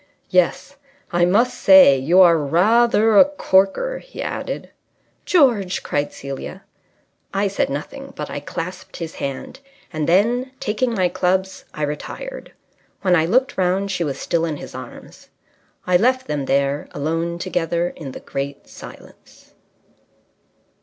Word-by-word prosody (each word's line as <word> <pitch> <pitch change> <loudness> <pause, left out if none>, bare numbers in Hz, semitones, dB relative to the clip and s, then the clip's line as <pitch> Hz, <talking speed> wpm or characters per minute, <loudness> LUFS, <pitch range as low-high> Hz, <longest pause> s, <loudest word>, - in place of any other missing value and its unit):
"Yes, 185 +10 +1 0.3
I 175 0 +3
must 235 +8 +2
say 190 -8 +7
you 160 +8 +4
are 170 -2 +7
rather 210 +8 +3
a - - +9
corker," 290 - +1
he - - -14
added. - - -5 0.5
"George!" 235 - +2
cried 145 0 -2
Celia. 135 -1 -8 0.7
I 200 +1 +1
said 200 - -1
nothing, 275 - -6
but 150 - -5
I - - -5
clasped 170 +5 -7
his 165 -2 -6
hand; 140 - -5 0.3
and 155 -1 -2
then, 240 +8 +2
taking 230 +3 -1
my 185 -3 +2
clubs, 185 +1 -1
I 155 - -3
retired. - - -6 0.5
When 185 -2 +4
I 160 -1 +2
looked 255 +7 +1
round 190 +2 0
she 180 -2 -1
was 140 -4 -3
still 170 -1 -1
in 160 -3 -2
his - - -10
arms. - - -11 0.6
I 180 -1 +4
left 255 +5 +1
them 145 -2 -3
there, 140 +2 0
alone 165 +3 -2
together 175 -1 -1
in 145 -7 -9
the - - -9
great 140 +1 -6
silence. - - -15
180 Hz, 140 wpm, -20 LUFS, 155-220 Hz, 0.7 s, a